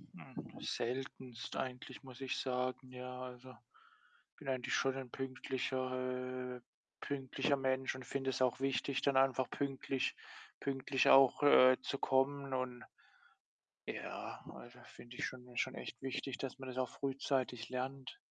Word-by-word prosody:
Hm, - - -9
seltenst 125 -1 -3
eigentlich, 130 0 -4
muss 130 0 -11
ich 135 0 -1
sagen, 130 0 -1
ja. 125 0 -6
Also, 125 0 -8
ich 125 - -25
bin 135 - -5
eigentlich 130 -2 0
schon 135 0 +2
ein 135 -2 -5
pünktlicher 130 -1 -2
äh, - - -15 0.4
pünktlicher 140 +1 0
Mensch 130 -1 +1
und 130 - -8
finde 135 -1 -1
es 130 - -2
auch 125 -1 +3
wichtig, 135 0 +1
dann 140 -2 +3
einfach 130 -1 +4
pünktlich 135 -1 -1 0.4
pünktlich 135 -1 +2
auch, 135 +1 +8
äh, 130 -3 +9
zu 140 - -2
kommen 135 +1 +2
und 125 -1 -2 1.1
ja, - - -5
also, 125 +1 -11
finde 120 0 -12
ich - - -1
schon 125 -1 -8
schon 130 +2 0
echt - - -7
wichtig, 135 0 -3
dass 135 0 -4
man 130 - -6
das 130 0 -6
auch 130 -2 +1
frühzeitig 130 -3 -1
lernt. 130 +1 -3
130 Hz, 150 wpm, -37 LUFS, 125-135 Hz, 1.1 s, äh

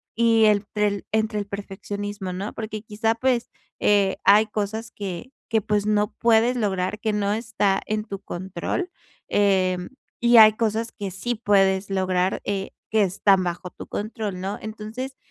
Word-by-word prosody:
y 225 -1 +4
entre 210 0 +2
el 200 -1 -3
entre 220 0 0
el 205 - -2
perfeccionismo, 200 -1 -5
¿no? 195 +3 -4
Porque 215 -1 -5
quizá, 220 +1 0
pues, 245 0 0 0.3
eh, 200 -2 +3
hay 210 +2 +6
cosas 215 +1 -3
que 200 +5 -6 0.2
que, 220 - +5
pues, 205 0 0
no 210 0 +1
puedes 230 +2 +3
lograr, 195 -4 -1
que 220 - 0
no 205 -1 0
está 215 -3 0
en 215 0 -2
tu 195 -3 -6
control, 190 - -4 0.4
em, 185 -3 +1 0.3
y 240 0 +6
hay 215 -1 +9
cosas 225 +1 -1
que 200 -2 -5
sí 240 +7 -3
puedes 195 -3 +2
lograr, 185 -1 0
eh, 195 -1 -2 0.2
que 220 -1 +3
están 195 0 +3
bajo 180 +1 -4
tu - - -10
control, 210 -3 -4
¿no? 195 +2 -3
Entonces, 220 +5 -6
210 Hz, 160 wpm, -24 LUFS, 195-220 Hz, 0.4 s, hay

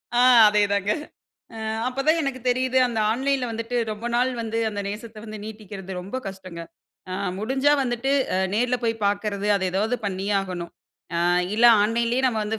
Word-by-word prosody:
அ - - +4 0.3
அதேதாங்க 205 -1 +2 0.7
அ - - -7 0.3
அப்ப 255 +1 -8
தான் 320 +1 +4
எனக்கு 270 -2 -3
தெரியுது, 255 +1 +2
அந்த 230 -2 -3
ஆன்லைன்ல 265 +1 0
வந்துட்டு 230 +2 -4
ரொம்ப 215 +2 -5
நாள் 250 +2 +2
வந்து 225 0 -3
அந்த 205 -1 -4
நேசத்த 215 +2 -7
வந்து 215 -1 -7
நீட்டிக்கிறது 205 -3 -8
ரொம்ப 195 +8 -6
கஷ்டங்க. 185 -3 -8 0.5
அ - - -3 0.3
முடிஞ்சா 265 +7 +2
வந்துட்டு 250 +2 -1 0.2
அ - - +1 0.2
நேர்ல 245 +2 +1
போய் 225 -1 -1
பார்க்குறது, 205 0 -1
அத 190 - -2
ஏதாவது 220 +6 0
பண்ணியே 195 +1 -2
ஆகணும். 180 -3 -6 0.4
அ - - +1 0.4
இல்ல 240 - +3 0.2
ஆன்லைன்‌லயே 235 +4 +1
நம்ம 225 -3 -1
வந்து 220 +1 -3
220 Hz, 165 wpm, -24 LUFS, 205-245 Hz, 0.7 s, அ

